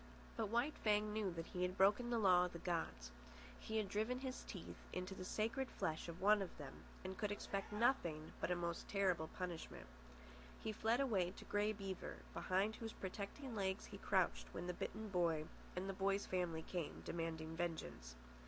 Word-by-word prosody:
But 220 - 0
White 240 +7 +2
Fang 210 0 +3
knew 215 -2 +1
that 165 -1 -3
he 180 - -4
had 180 +1 +1
broken 205 +5 +5
the 240 - +2
law 180 -4 +7
of 180 - -4
the - - -4
gods. 65 - -2 0.5
He 220 - -2
had 215 -2 +2
driven 220 +5 +1
his 260 -1 -3
teeth - - -7
into 185 +1 -2
the 185 - -5
sacred 230 +7 0
flesh 160 -4 -1
of 170 +1 -6
one 205 +2 +6
of 190 - -4
them, - - -6 0.3
and 185 0 -3
could 210 -1 +1
expect 200 -1 -2
nothing 180 - +2
but - - +1
a 180 - +3
most 170 -1 -2
terrible 185 -5 +2
punishment. 175 - -5 0.7
He 220 - -2
fled 225 +3 +2
away 200 -10 +3
to - - -8
Grey 205 +1 +2
Beaver, 195 -3 -4 0.2
behind 195 +4 +1
whose 225 -1 -4
protecting 200 +7 -4
legs 190 -3 0
he - - -8
crouched 60 +1 +2
when - - -2
the 180 - -1
bitten 215 +4 -3
boy 170 -4 +2 0.3
and 185 +2 -1
the 195 - -1
boy's 195 +1 +2
family 175 -3 0
came, 175 -3 -3
demanding 160 -1 -2
vengeance. 160 - -3
190 Hz, 190 wpm, -42 LUFS, 175-215 Hz, 0.7 s, law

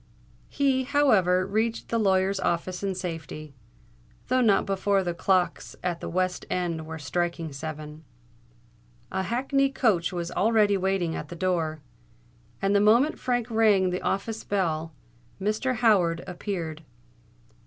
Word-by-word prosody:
He, 275 -2 +1
however, 210 -11 +3
reached 220 +3 -1
the 230 - +1
lawyer's 190 -1 +2
office 180 +1 -1
in 195 -2 -2
safety, 165 -4 -6 0.8
though 255 +1 +3
not 210 -5 +4
before 195 0 +1
the 175 -1 -2
clocks 180 +1 0
at 175 -2 -1
the - - -5
West 185 +1 -1
End 170 -3 -2
were 160 0 -6
striking 165 +1 -2
seven. 155 +1 -7 1.1
A 190 - -1
hackney 270 +7 +1
coach 210 -11 +1
was 175 -2 -4
already 210 0 +3
waiting 190 -3 0
at 150 - -6
the 175 - -7
door; 165 -4 -1 0.8
and 195 +1 +2
the 200 - +5
moment 235 +9 +4
Frank 245 -2 -1
rang 210 -5 +4
the 180 - -2
office 220 +3 -2
bell, 165 -5 -1 0.5
Mr. 215 +6 0
Howard 190 -8 +3
appeared. 175 -4 -5
190 Hz, 135 wpm, -26 LUFS, 170-220 Hz, 1.1 s, the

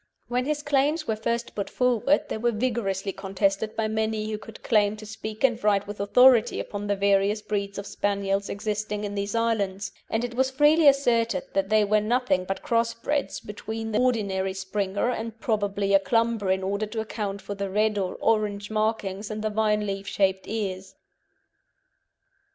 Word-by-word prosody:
When 250 +1 0
his 295 0 -1
claims 290 +2 +1
were 220 - +1
first 235 +2 -2
put 200 - -3
forward 250 +3 +2
they - - -3
were 240 +1 +2
vigorously 210 -4 -1
contested 195 +2 -1
by 220 -1 0
many 220 0 -1
who 210 - -3
could 220 0 -12
claim 210 -2 +2
to 215 - -10
speak 215 +1 -7
and 240 -4 +2
write 205 -1 +3
with 205 0 -8
authority 240 +3 +5
upon 205 0 -5
the 205 - +1
various 200 +1 +2
breeds 200 -1 -3
of 200 - -5
Spaniels 200 -1 -1
existing 210 0 -3
in 205 -1 -3
these 200 +1 -3
islands, 205 -4 0 0.2
and 225 +2 0
it 245 -1 -3
was 260 +2 +2
freely 295 +4 +4
asserted 235 -8 +3
that 195 0 0
they 215 -1 +4
were 210 +1 +3
nothing 230 -4 +1
but 195 +1 -4
crossbreds 230 +5 0
between 220 +2 -6
the 210 - +1
ordinary 200 -6 0
Springer 195 +3 -1
and 225 -1 -5
probably 205 -2 0
a 195 - +7
Clumber 230 -1 +1
in 190 0 +1
order 200 +3 -1
to 220 +1 -5
account 205 -2 -4
for 205 - -6
the 200 -1 -4
red 210 +1 +1
or 185 -2 -2
orange 210 -2 0
markings 215 -2 -1
and 215 0 -4
the 215 - 0
vine 210 0 +1
leaf 195 -1 -4
shaped 190 -1 0
ears. 190 -3 -4
215 Hz, 180 wpm, -26 LUFS, 200-230 Hz, 0.2 s, a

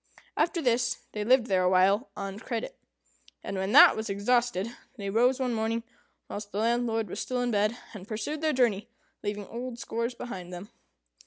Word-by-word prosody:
After 335 +1 +1
this, 245 -1 +2
they 210 - -3
lived 250 +2 +4
there 190 -4 +2
awhile 190 +6 +3
on 195 0 -5
credit; 235 - -4 0.7
and - - -4
when 190 +1 -1
that - - +9
was 220 0 -4
exhausted, 210 0 +1 0.3
they 200 -1 -4
rose 250 +5 +3
one 255 -2 0
morning 225 +1 -1 0.4
whilst 205 0 -7
the - - -5
landlord 225 0 +1
was - - -6
still 255 -1 -2
in 245 -1 0
bed, 210 +2 +1 0.2
and 200 -2 -9
pursued 230 +8 -4
their 315 -1 +2
journey, 235 -7 +1 0.3
leaving 205 0 -3
old 240 +2 -6
scores 235 +1 -3
behind 185 -8 -7
them. 180 +4 -8
225 Hz, 175 wpm, -28 LUFS, 200-245 Hz, 0.7 s, that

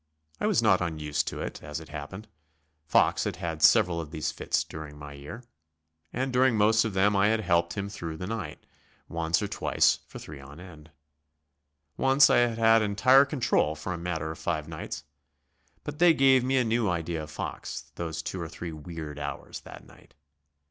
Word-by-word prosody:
I - - 0
was 115 - +2
not 95 -5 +4
unused 75 -4 -2
to - - -4
it, - - -6
as 75 +1 -6
it 80 - -12
happened. 80 +8 -8 0.6
Fox - - +3
had - - -2
had 80 -2 -5
several 90 -4 +5
of 75 - -8
these 75 -1 -3
fits - - -1
during 75 -2 -9
my 75 0 -9
year, 75 - -9 0.7
and 130 +1 -2
during 125 -2 +3
most 110 +2 +4
of 105 -4 -3
them 100 +2 +3
I 100 +1 +4
had 110 0 +2
helped 85 -3 +1
him 100 -1 -3
through 85 -5 -6
the 90 - -5
night; 110 -2 -6 0.4
once 85 +2 0
or - - -1
twice - - +2
for - - -10
three 75 -2 -10
on 70 +3 -12
end. 80 -4 -13 1.1
Once 135 +1 +5
I - - +5
had 120 -2 +2
had 115 0 +5
entire 130 +7 +5
control 125 - +1
for 80 +5 -5
a - - -4
matter 80 -2 -3
of 80 - -9
five 80 -3 -2
nights. 75 -5 -6 0.8
But 145 0 -7
they 175 -2 +6
gave 135 -2 +5
me 130 +1 +1
a 130 - +3
new 115 -2 +1
idea 85 -2 -2
of 75 - -8
Fox, 70 -2 -6
those 80 0 -5
two 95 - -4
or 85 - -5
three 85 +1 -7
weird 80 -1 -7
hours 70 -2 -6
that - - -12
night. - - -20
85 Hz, 195 wpm, -28 LUFS, 80-110 Hz, 1.1 s, they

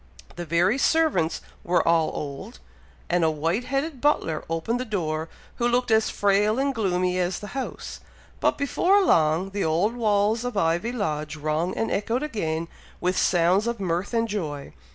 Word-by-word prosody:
The 175 -1 -6
very 180 - +2
servants 290 - +2 0.2
were 175 -1 +1
all 165 -1 +3
old; 150 - -6 0.5
and 175 -1 +1
a 160 - +4
white 165 +9 -1
headed 275 +1 -2
butler 165 - +1
opened 165 +9 -1
the - - -1
door, 160 -8 -3 0.3
who 240 - +1
looked 245 -1 +1
as 220 0 +3
frail 205 +2 +2
and 275 +1 +1
gloomy 185 -5 0
as 180 0 0
the 205 - -8
house; 270 -1 -5 0.4
but - - +1
before 365 +8 +3
long, 165 - +2
the 200 0 -2
old 170 +9 +1
walls 215 0 +1
of 245 -4 -4
Ivy 175 +5 +1
Lodge 155 -10 -3
rung 155 +4 -2
and 225 - -1
echoed 230 +6 -1
again 165 - -2 0.3
with 180 +1 0
sounds 180 +5 +3
of 235 -1 -2
mirth 180 0 -2
and 230 -1 +1
joy. 155 -10 -4
195 Hz, 170 wpm, -25 LUFS, 165-235 Hz, 0.5 s, a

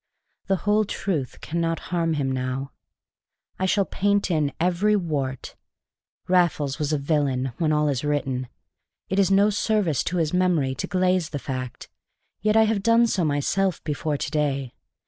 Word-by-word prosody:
The 195 - +3
whole 210 +1 +3
truth 170 -9 -3
cannot 165 0 -1
harm 165 -2 +1
him 135 -3 -1
now. 130 +1 -3 0.9
I 190 - +1
shall 200 +1 +2
paint 200 0 0
in 150 -4 +1
every 180 +5 +2
wart. 145 - -3 0.7
Raffles 165 -6 +2
was 150 -1 -1
a 150 - +2
villain, 140 -3 0
when 160 -2 +2
all 150 0 +2
is 140 -2 -1
written; 135 -4 -1 0.6
it 190 - +1
is 195 - +4
no 200 +2 +4
service 195 - +1
to 180 - -1
his 160 -1 0
memory 175 -7 +2
to 130 - -4
glaze 185 -3 +1
the 145 - -4
fact; 130 -3 -6 0.5
yet 215 +2 +2
I 220 - +7
have 220 -2 +1
done 230 +3 +4
so 195 -6 0
myself 165 +5 0
before 150 0 -2
to 140 - -4
day. 140 -4 -1
160 Hz, 165 wpm, -24 LUFS, 140-190 Hz, 0.9 s, I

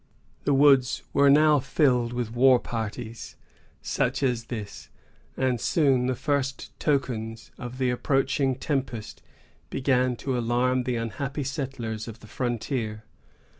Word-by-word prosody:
The 145 - +3
woods 135 -2 +4
were 140 0 +5
now 150 +1 +6
filled 125 -3 +2
with 120 -2 -3
war 130 +1 +6
parties 115 0 -6 0.5
such - - -1
as 120 -3 0
this, 110 -5 -7 0.5
and 130 -3 0
soon 135 -6 +2
the 130 - 0
first 140 0 -2
tokens 115 -6 -2
of 125 +1 -7
the 130 -1 +1
approaching 135 +1 +1
tempest 130 -5 -3 0.5
began 130 -2 +1
to 130 +2 -3
alarm 125 +1 +1
the 125 - -1
unhappy 135 +6 -3
settlers 130 -5 -4
of 115 0 -8
the - - -12
frontier. 115 -1 -3
125 Hz, 130 wpm, -26 LUFS, 115-135 Hz, 0.5 s, now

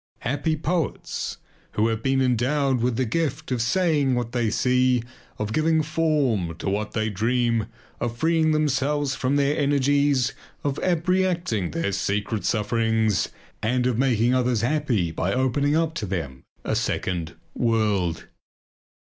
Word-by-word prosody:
Happy 145 +4 0
poets, 165 +1 -2 0.4
who 110 +2 +2
have 115 -1 -1
been 135 +1 +2
endowed 130 +1 +1
with 125 0 +1
the 130 - +1
gift 155 +3 -2
of 125 -2 0
saying 145 -1 +2
what 120 -1 -2
they 120 -3 0
see, 125 +2 +2 0.3
of 105 0 -3
giving 160 +3 +2
form 145 - 0
to - - -6
what 105 +2 -1
they 110 -1 0
dream, 115 +2 0 0.3
of 120 -1 -3
freeing 160 +1 +2
themselves 145 -1 +1
from 130 +2 0
their 145 +1 +2
energies, 140 -2 +2 0.3
of 145 -1 -1
abreacting 175 - +1
their 165 -11 -1
secret 100 +3 -1
sufferings 110 -1 +1 0.3
and 125 +3 +1
of 125 -2 +1
making 125 -2 +2
others 125 -3 +1
happy 120 - 0
by 85 +3 -1
opening 130 +4 +1
up 160 0 +1
to 110 -11 -4
them 80 -8 -4 0.2
a - - -1
second 85 -3 -2 0.2
world! 105 -8 0
125 Hz, 140 wpm, -24 LUFS, 110-145 Hz, 0.4 s, who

